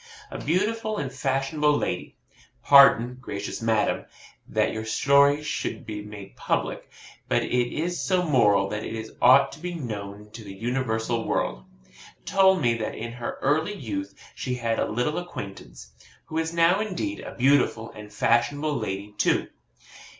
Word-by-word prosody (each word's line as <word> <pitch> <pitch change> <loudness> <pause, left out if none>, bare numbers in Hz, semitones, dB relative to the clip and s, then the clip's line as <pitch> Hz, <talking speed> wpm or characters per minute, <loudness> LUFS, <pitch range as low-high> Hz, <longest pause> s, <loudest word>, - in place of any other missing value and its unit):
A - - -6
beautiful 215 +6 0
and 135 -6 -4
fashionable 140 +3 +1
lady - - -3 0.5
(pardon, 130 -3 +6
gracious 100 -4 -5
madam, 115 -1 +1 0.4
that - - 0
your 110 - -4
story 140 +6 +3
should - - -4
be 105 -1 -5
made 105 -2 -10
public; - - -2 0.4
but - - +2
it 125 -1 0
is 175 +3 -2
so 185 -2 +1
moral 105 - +3
that 105 +1 -4
it 110 -1 -6
ought 135 +3 +6
to 145 - -11
be 175 +1 -5
known 105 -6 -7
to 115 0 -10
the 100 -2 -9
universal 115 0 -2
world) 60 - -1 0.6
told 190 -4 +4
me 120 -1 +3
that 110 - -3
in 115 +1 -5
her 120 0 -5
early 160 +8 +1
youth 100 - -5 0.2
she 125 -1 -3
had 115 -2 -1
a - - 0
little 125 +9 -1
acquaintance, 100 - -9 0.3
who 160 - -3
is 165 0 -2
now 170 +3 +3
indeed 215 +9 -3
a - - -8
beautiful 125 -4 +2
and 105 0 -11
fashionable 145 +8 +1
lady 105 -3 -4
too. - - +2
125 Hz, 155 wpm, -25 LUFS, 110-150 Hz, 0.6 s, pardon